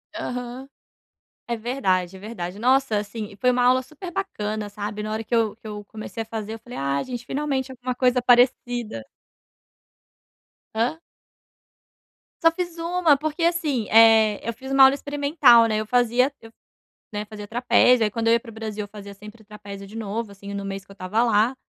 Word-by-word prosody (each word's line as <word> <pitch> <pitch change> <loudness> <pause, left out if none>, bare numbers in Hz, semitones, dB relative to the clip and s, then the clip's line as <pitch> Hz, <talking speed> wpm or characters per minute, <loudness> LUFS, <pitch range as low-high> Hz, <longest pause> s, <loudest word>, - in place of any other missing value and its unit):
Aham, 250 +1 -5 0.8
é 235 -1 -2
verdade, 195 -7 -1
é - - -11
verdade. 200 -4 -6
Nossa, 255 -1 +2
assim, 210 +1 -5
e 200 - -14
foi 250 +5 +2
uma 245 0 +1
aula 255 +1 +4
super 310 +7 -9
bacana, 215 - -3
sabe, 210 +1 -5
na 215 0 -4
hora 220 +1 -3
que 235 - -3
eu 225 -2 +2
que - - -15
eu 210 -1 -7
comecei 220 +2 -7
a 225 - -11
fazer, 220 -1 -5
eu - - -8
falei: 240 +2 -10
"Ah, 140 0 0
gente 245 -2 -6
finalmente 270 -2 -2
alguma 250 0 -4
coisa 250 0 +2
parecida". 245 - +2 1.7
Hã? 240 +8 0 1.4
Só 330 -1 +6
fiz 345 0 -5
1, 335 -3 +2
porque, 310 +3 -3
assim, 310 - 0
eh, 220 -2 +6
eu 230 - -1
fiz 265 +4 -9
uma 270 0 +7
aula 265 +1 +8
experimental, 285 -5 +4
né. 215 -1 0
Eu 215 - -4
fazia 245 +3 +2
eu, 225 0 -13 0.6
né, 210 0 -4
fazia 210 -1 -9
trapézio, 245 +1 +4
aí, 210 - 0
quando 230 +1 -2
eu 230 - +5
ia 235 - +4
para 230 0 -13
o - - -14
Brasil, 215 -1 -5
eu 205 - -8
fazia 200 -1 -10
sempre 210 +2 -13
trapézio 200 -1 -10
de 215 - -13
novo, 220 0 -4
assim, 200 0 -9
no 200 0 -4
mês 195 0 -5
que - - -17
eu - - -11
estava 200 +5 0
lá. 225 +2 +2
230 Hz, 195 wpm, -23 LUFS, 210-255 Hz, 1.7 s, aula